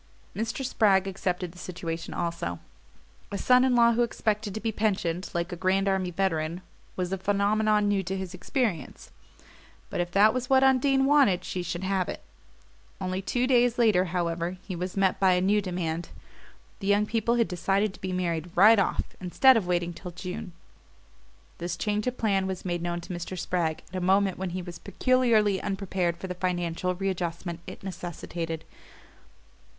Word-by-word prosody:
Mr. 225 Hz, +5 st, -3 dB
Spragg 200 Hz, -6 st, +3 dB
accepted 180 Hz, -2 st, -2 dB
the 180 Hz, -, -14 dB
situation 170 Hz, -2 st, -5 dB
also. 170 Hz, -, -3 dB, 0.7 s
A 200 Hz, -, -2 dB
son 250 Hz, +4 st, +5 dB
in 260 Hz, -1 st, +3 dB
law 235 Hz, -1 st, +5 dB
who 235 Hz, -, +1 dB
expected 215 Hz, -2 st, -1 dB
to -, -, -2 dB
be 225 Hz, 0 st, -1 dB
pensioned 190 Hz, -5 st, -1 dB
like 170 Hz, +1 st, -2 dB
a -, -, -3 dB
Grand 190 Hz, +2 st, +1 dB
Army 190 Hz, -2 st, +1 dB
veteran 170 Hz, -2 st, -1 dB, 0.3 s
was 180 Hz, 0 st, -2 dB
a 195 Hz, -, -2 dB
phenomenon 205 Hz, +2 st, +2 dB
new 200 Hz, -1 st, +2 dB
to 190 Hz, +1 st, -3 dB
his 190 Hz, -1 st, -5 dB
experience; 180 Hz, -, -3 dB, 0.8 s
but -, -, -3 dB
if 175 Hz, -, -2 dB
that 205 Hz, +4 st, +5 dB
was 255 Hz, -1 st, -3 dB
what 265 Hz, 0 st, +5 dB
Undine 270 Hz, +1 st, +4 dB
wanted 275 Hz, -11 st, +4 dB
she 185 Hz, -, -3 dB
should 175 Hz, +1 st, -4 dB
have 190 Hz, -1 st, 0 dB
it. -, -, -6 dB, 0.8 s
Only 185 Hz, 0 st, -2 dB
two 245 Hz, +5 st, 0 dB
days 245 Hz, -2 st, +3 dB
later, 215 Hz, -6 st, +4 dB
however, 170 Hz, 0 st, -2 dB
he 190 Hz, -, -4 dB
was 180 Hz, +2 st, -4 dB
met 195 Hz, -1 st, +2 dB
by 190 Hz, -1 st, +5 dB
a 180 Hz, -, +3 dB
new 200 Hz, +3 st, +2 dB
demand 175 Hz, -3 st, -3 dB, 0.7 s
the 195 Hz, -, -5 dB
young 205 Hz, +1 st, +3 dB
people 230 Hz, +1 st, 0 dB
had 230 Hz, -2 st, +2 dB
decided 195 Hz, +3 st, 0 dB
to -, -, -15 dB
be 185 Hz, -, -3 dB
married 175 Hz, -2 st, -2 dB
"right 210 Hz, +4 st, +7 dB
off," 195 Hz, -, +1 dB, 0.2 s
instead 255 Hz, +9 st, +5 dB
of 210 Hz, -6 st, 0 dB
waiting 175 Hz, -1 st, 0 dB
till 180 Hz, +2 st, -8 dB
June. 180 Hz, +1 st, -6 dB, 1.1 s
This 175 Hz, 0 st, -3 dB
change 210 Hz, +4 st, -1 dB
of 250 Hz, 0 st, -2 dB
plan 195 Hz, -4 st, +1 dB
was 190 Hz, -1 st, -5 dB
made 175 Hz, -1 st, -2 dB
known 175 Hz, 0 st, -2 dB
to 175 Hz, -, -7 dB
Mr. 175 Hz, +2 st, -5 dB
Spragg 170 Hz, -3 st, -1 dB
at 185 Hz, -, -10 dB
a -, -, -2 dB
moment 190 Hz, +1 st, +2 dB
when 190 Hz, -1 st, -2 dB
he 180 Hz, +1 st, -4 dB
was 175 Hz, -1 st, -8 dB
peculiarly 230 Hz, -6 st, +2 dB
unprepared 190 Hz, -3 st, -1 dB
for 180 Hz, -, -7 dB
the 180 Hz, -, -4 dB
financial 180 Hz, 0 st, -1 dB
readjustment 175 Hz, -2 st, -3 dB
it -, -, -9 dB
necessitated. 170 Hz, -3 st, -5 dB
190 Hz, 180 wpm, -27 LUFS, 175-210 Hz, 1.1 s, right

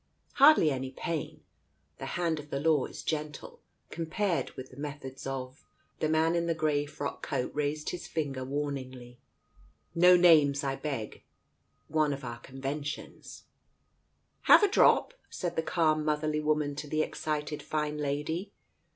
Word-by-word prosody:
Hardly 275 Hz, -, +7 dB
any 130 Hz, -1 st, -3 dB
pain. 155 Hz, +3 st, -5 dB, 0.6 s
The -, -, -5 dB
hand 165 Hz, -3 st, 0 dB
of 150 Hz, 0 st, -10 dB
the 140 Hz, -, -2 dB
law 150 Hz, -2 st, +3 dB
is -, -, -9 dB
gentle, 155 Hz, -1 st, -4 dB, 0.3 s
compared 170 Hz, +3 st, -1 dB
with 130 Hz, 0 st, -8 dB
the 130 Hz, -, -14 dB
methods 140 Hz, -2 st, -7 dB
of 130 Hz, 0 st, -5 dB, 0.2 s
" -, -, -41 dB
The 155 Hz, -, 0 dB
man 160 Hz, +1 st, +3 dB
in 170 Hz, 0 st, 0 dB
the 165 Hz, -, +1 dB
grey 150 Hz, -2 st, 0 dB
frock 145 Hz, -1 st, -5 dB
coat 130 Hz, -4 st, -2 dB
raised 150 Hz, +1 st, -2 dB
his 175 Hz, -, -6 dB
finger 140 Hz, -5 st, -3 dB
warningly. 130 Hz, -3 st, -5 dB, 0.7 s
"No 180 Hz, +1 st, +7 dB
names, 150 Hz, -5 st, +5 dB
I 135 Hz, -1 st, -1 dB
beg. 135 Hz, -8 st, -5 dB, 0.7 s
One 155 Hz, -2 st, +1 dB
of 140 Hz, -, -7 dB
our 120 Hz, -1 st, -6 dB
conven 135 Hz, +2 st, -5 dB
tions...! 145 Hz, +1 st, -8 dB, 0.3 s
" -, -, -44 dB
" -, -, -45 dB
Have -, -, +9 dB
a -, -, +6 dB
drop? 405 Hz, +5 st, +4 dB
" -, -, -38 dB
said 175 Hz, -2 st, -4 dB
the -, -, +1 dB
calm 155 Hz, -2 st, +1 dB
motherly 150 Hz, 0 st, 0 dB
woman 150 Hz, -1 st, +1 dB
to 150 Hz, -, -5 dB
the 155 Hz, +1 st, +1 dB
excited 150 Hz, -1 st, -3 dB
fine 150 Hz, -1 st, -2 dB
lady. 150 Hz, +7 st, -2 dB
150 Hz, 165 wpm, -30 LUFS, 140-160 Hz, 0.7 s, Have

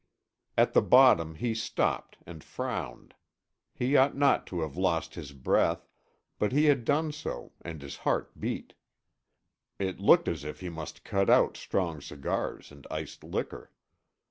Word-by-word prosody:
At -, -, +4 dB
the -, -, +6 dB
bottom 80 Hz, -1 st, +5 dB
he 115 Hz, +8 st, -1 dB
stopped 110 Hz, -, -1 dB
and 80 Hz, -3 st, -10 dB
frowned. -, -, -5 dB, 0.6 s
He 130 Hz, +3 st, +1 dB
ought 135 Hz, +1 st, +4 dB
not 140 Hz, 0 st, +3 dB
to 90 Hz, -2 st, -3 dB
have 80 Hz, -3 st, -4 dB
lost 85 Hz, -3 st, 0 dB
his 75 Hz, -5 st, -8 dB
breath, 70 Hz, -2 st, +1 dB, 0.5 s
but 105 Hz, -, +1 dB
he 145 Hz, +4 st, +3 dB
had 140 Hz, -6 st, +3 dB
done 155 Hz, +3 st, +1 dB
so 150 Hz, -, -6 dB
and 80 Hz, -2 st, -7 dB
his 70 Hz, -, -7 dB
heart -, -, -2 dB
beat. -, -, -4 dB, 1.0 s
It 95 Hz, -2 st, -3 dB
looked 170 Hz, -, +5 dB
as 80 Hz, -4 st, -2 dB
if 75 Hz, -, -7 dB
he 90 Hz, -, -4 dB
must 80 Hz, -1 st, -8 dB
cut 100 Hz, 0 st, 0 dB
out -, -, +5 dB
strong 85 Hz, -6 st, -2 dB
cigars 70 Hz, +1 st, -4 dB
and 70 Hz, -2 st, -14 dB
iced -, -, -6 dB
liquor. -, -, -5 dB
90 Hz, 155 wpm, -29 LUFS, 80-125 Hz, 1.0 s, the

